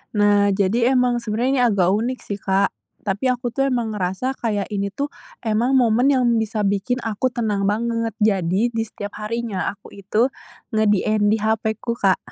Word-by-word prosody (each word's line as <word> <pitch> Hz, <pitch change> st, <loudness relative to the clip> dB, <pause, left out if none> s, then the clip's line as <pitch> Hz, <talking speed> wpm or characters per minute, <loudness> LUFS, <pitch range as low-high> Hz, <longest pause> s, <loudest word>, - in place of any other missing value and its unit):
Nah, 205 Hz, -1 st, +4 dB
jadi 230 Hz, +6 st, +2 dB
emang 250 Hz, -1 st, +2 dB
sebenarnya 235 Hz, +3 st, -1 dB
ini -, -, +4 dB
agak 185 Hz, -2 st, +3 dB
unik 235 Hz, +5 st, -1 dB
sih, 205 Hz, -1 st, -5 dB
Kak. 195 Hz, +1 st, +1 dB, 0.4 s
Tapi 205 Hz, +7 st, +1 dB
aku 250 Hz, 0 st, -3 dB
tuh 270 Hz, 0 st, +2 dB
emang 230 Hz, -3 st, -1 dB
ngerasa 190 Hz, +8 st, -2 dB
kayak, 210 Hz, -5 st, -2 dB
ini 200 Hz, -1 st, -2 dB
tuh 280 Hz, +8 st, -2 dB, 0.4 s
emang 230 Hz, +3 st, +1 dB
momen 245 Hz, +2 st, +4 dB
yang 260 Hz, -2 st, +2 dB, 0.2 s
bisa 220 Hz, -1 st, -1 dB
bikin 200 Hz, +5 st, 0 dB
aku 225 Hz, +3 st, -1 dB
tenang 215 Hz, -5 st, -1 dB
banget. 230 Hz, +2 st, 0 dB
Jadi, 195 Hz, 0 st, +2 dB
di 225 Hz, -1 st, -1 dB
setiap 205 Hz, -2 st, -8 dB
harinya 215 Hz, -2 st, -2 dB
aku 200 Hz, 0 st, -16 dB
itu 210 Hz, +5 st, +1 dB, 0.5 s
nge-DND 210 Hz, 0 st, +2 dB
HP-ku, 220 Hz, +2 st, -1 dB
Kak. 195 Hz, -5 st, +2 dB
215 Hz, 165 wpm, -21 LUFS, 205-240 Hz, 0.5 s, Nah